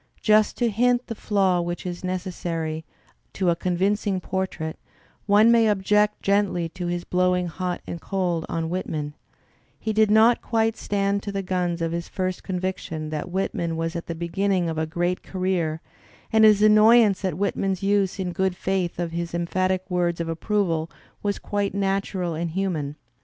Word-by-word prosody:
Just 215 -1 +4
to 240 -2 +1
hint 245 +3 +2
the 230 - -5
fiaw 195 -5 +1
which 175 +1 -4
is 175 0 -5
necessary 170 -3 -3 0.5
to 185 -3 +1
a - - +1
convincing 190 +3 0
portrait^ 180 -4 -3 0.5
one 210 +3 +6
may 230 -1 +5
object 210 +1 +2
gently 200 -4 +1
to 175 +2 -5
his 175 0 -2
blowing 180 0 +1
hot 180 +1 -3
and 170 - -6
cold 180 -4 -1
on 165 -1 -2
Whit 185 +1 -3
man; 150 -2 -3 0.7
he 220 - -2
did 215 0 +4
not 220 +3 +5
quite 225 -1 +1
stand 200 0 -1
to 205 - -5
the 195 -1 -3
guns 175 -2 -1
of 165 - -1
his 170 0 -3
first 185 -1 -2
convic 185 0 -3
tion 155 -1 -6
that 155 +3 -4
Whitman 175 -3 -2
was 165 +1 -2
at 170 - -5
the 170 - -4
beginning 175 +1 0
of 160 - -3
"a 160 - -1
great 175 +3 -1
career," 180 -4 -1 0.5
and 220 0 +6
his 210 -1 +6
annoyance 215 -1 +6
at 185 -4 -1
Whitman's 195 -1 -1
use 200 -1 +1
in 185 -2 -2
good 190 0 0
faith 185 -2 -1
of 170 -1 -2
his 170 0 -3
emphatic 185 +2 0
words 175 -2 0
of 170 - -2
approval 165 -1 -1 0.3
was 205 -1 -1
quite 200 -1 -2
natural 195 -3 -1
and 165 +2 -2
human. 160 -5 -2
185 Hz, 175 wpm, -24 LUFS, 170-200 Hz, 0.7 s, one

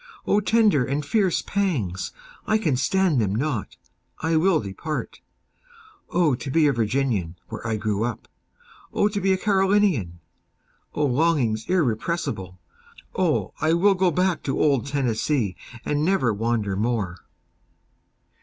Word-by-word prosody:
O 205 - +3
tender 210 - +3
and 140 +3 -2
fierce 190 +2 +1
pangs—I 200 - -2
can 160 -11 0
stand 180 -1 +2
them 100 -1 0
not—I 150 +5 -4
will 170 +1 +3
depart;O 175 - -5
to 130 +3 -4
be 155 +3 +3
a 145 - +3
Virginian, 115 -7 -1
where - - -6
I 110 - 0
grew 105 0 -1
up! 120 -3 -4 0.6
O 205 - +2
to 205 -1 -3
be 190 +1 +2
a 190 - +3
Carolinian!O 185 - -1
longings 125 -6 +1
irrepressible! 135 - -1 0.6
O - - 0
I 155 +1 +3
will 195 +4 +4
go 185 -1 +2
back 180 +1 0
to 135 - -2
old 140 -4 +2
Tennessee, 130 -5 0 0.3
and 150 0 0
never 155 - +2
wander 110 -2 -1
more! 105 -4 -1
145 Hz, 125 wpm, -24 LUFS, 110-190 Hz, 0.6 s, will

